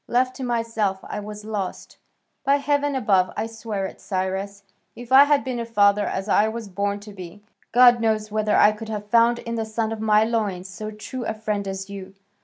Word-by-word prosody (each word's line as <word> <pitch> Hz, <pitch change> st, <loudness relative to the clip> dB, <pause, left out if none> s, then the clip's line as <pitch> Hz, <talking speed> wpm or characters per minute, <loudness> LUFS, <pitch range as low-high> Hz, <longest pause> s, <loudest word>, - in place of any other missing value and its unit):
Left 255 Hz, +1 st, +1 dB
to 265 Hz, -, -5 dB
myself 230 Hz, -5 st, -1 dB
I -, -, -5 dB
was 210 Hz, 0 st, -8 dB
lost. 205 Hz, -4 st, -5 dB, 0.4 s
By 280 Hz, 0 st, +4 dB
heaven 285 Hz, 0 st, 0 dB
above, 195 Hz, -7 st, +2 dB
I 215 Hz, -, -1 dB
swear 220 Hz, -3 st, -4 dB
it, -, -, -9 dB
Cyrus, 195 Hz, +1 st, -3 dB, 0.3 s
if 240 Hz, +1 st, -11 dB
I 270 Hz, +2 st, +9 dB
had 290 Hz, -1 st, +2 dB
been 255 Hz, -2 st, -3 dB
a -, -, -2 dB
father 205 Hz, -2 st, +3 dB
as 190 Hz, +1 st, -3 dB
I 210 Hz, +1 st, +3 dB
was 225 Hz, 0 st, -5 dB
born 200 Hz, +1 st, -2 dB
to 210 Hz, 0 st, -11 dB
be, 185 Hz, +1 st, -10 dB, 0.3 s
God 245 Hz, 0 st, +6 dB
knows 215 Hz, -1 st, 0 dB
whether 215 Hz, 0 st, +1 dB
I 210 Hz, -, +6 dB
could 215 Hz, +1 st, -8 dB
have 210 Hz, -1 st, -6 dB
found 235 Hz, 0 st, +5 dB
in 235 Hz, 0 st, -6 dB
the 225 Hz, -1 st, -1 dB
son 220 Hz, 0 st, -2 dB
of 220 Hz, -1 st, -5 dB
my 215 Hz, -1 st, +4 dB
loins 210 Hz, -5 st, -2 dB
so 215 Hz, +3 st, -7 dB
true 215 Hz, +4 st, -7 dB
a 220 Hz, -, -2 dB
friend 210 Hz, -2 st, -3 dB
as 195 Hz, 0 st, -5 dB
you. 195 Hz, -1 st, -9 dB
215 Hz, 210 wpm, -23 LUFS, 200-230 Hz, 0.4 s, I